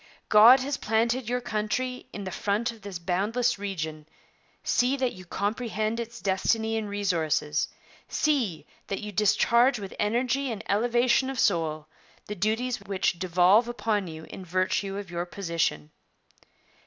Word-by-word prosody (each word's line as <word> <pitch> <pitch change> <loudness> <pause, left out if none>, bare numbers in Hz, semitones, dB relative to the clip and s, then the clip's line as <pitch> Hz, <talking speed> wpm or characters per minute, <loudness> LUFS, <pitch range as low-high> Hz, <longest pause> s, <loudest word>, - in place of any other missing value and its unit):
God 230 +5 +8
has 280 +2 -2
planted 230 +2 0
your 250 0 0
country 245 +3 -2
in 205 - -6
the 190 - -5
front 215 +5 -1
of 225 -2 -15
this 200 -2 -6
boundless 205 +7 0
region; 160 -6 -5 0.6
see 255 +3 +2
that 255 -2 0
you 185 0 -12
comprehend 215 +3 -2
its 235 0 -6
destiny 220 +4 0
and 220 -2 -2
resources 160 -7 0 0.4
see 255 - 0 0.2
that 195 - -3
you 210 0 -6
discharge 235 +5 +3
with 195 -2 -7
energy 245 +5 0
and 215 - -5
elevation 240 +5 +2
of 270 - -5
soul 160 -5 +1 0.4
the 210 - -5
duties 220 +5 -1
which 195 -3 -1
devolve 185 +5 +4
upon 220 -5 -1
you 160 -1 -8
in 190 - -8
virtue 185 +2 -1
of 200 -3 -7
your 175 +1 -3
position. 165 - -2
210 Hz, 145 wpm, -27 LUFS, 185-235 Hz, 0.6 s, God